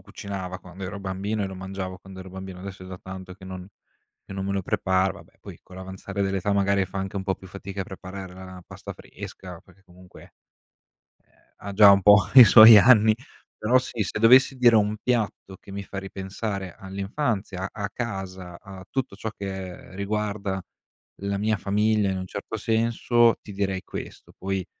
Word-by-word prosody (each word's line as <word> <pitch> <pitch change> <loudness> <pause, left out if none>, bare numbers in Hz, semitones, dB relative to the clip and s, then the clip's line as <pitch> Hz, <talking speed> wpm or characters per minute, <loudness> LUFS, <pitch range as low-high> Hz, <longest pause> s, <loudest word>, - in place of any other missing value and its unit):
cucinava 95 -2 -7
quando 90 +1 -10
ero 100 +2 -6
bambino 100 +2 -3
e - - -1
lo 95 - -7
mangiavo 95 0 -6
quando 95 0 -12
ero 95 0 -10
bambino, 95 -1 -8
adesso 95 -1 -8
è - - -10
da 95 0 -8
tanto 95 -1 -9
che 95 0 -15
non 95 -1 -8 0.6
che - - -9
non 95 0 -4
me 100 - -1
lo 100 - -1
prepara, 95 +1 +1
vabbè 85 - -19
poi - - -11
con 95 - -14
l'avanzare 95 +1 -5
dell'età 95 +1 -1
magari 100 -1 +2
fa 95 - -9
anche 95 +1 -4
un 95 - -2
po' 95 0 -1
più 95 - -14
fatica 100 +1 -6
a - - -9
preparare 95 -1 -9
la 95 +1 -11
la 95 -1 -11
pasta - - -9
fresca, 90 -3 -10
perché 95 +1 -23
comunque, 90 0 -17 1.0
ehm, - - -31 0.2
ha 100 -1 -7
già 100 0 +8
un 100 - +4
po' 105 +2 +8 0.2
i 125 - +12
suoi 110 -1 +10
anni. 110 -1 +6 0.4
Però 120 +4 +3
sì, 125 -3 -5
se - - -4
dovessi 130 +4 +6
dire 120 -2 +5
un 105 0 +1
piatto 110 -5 -2
che - - -14
mi 100 0 -5
fa 100 - -9
ripensare 95 0 -5
all'infanzia, 100 0 -3
a 100 -1 -4
casa, 95 -6 -6
a 95 -4 -11
tutto 130 -7 -3
ciò 110 - -4
che 95 -3 -7
riguarda 100 -1 -2 0.6
la 100 0 -1
mia 110 +1 0
famiglia 105 +2 +1
in 95 - -2
un 95 - -5
certo 100 +3 -6
senso, 115 +1 +2
ti 105 - -11
direi 95 -1 -2
questo. - - -9
Poi 95 -1 -3
95 Hz, 190 wpm, -25 LUFS, 95-105 Hz, 1.0 s, i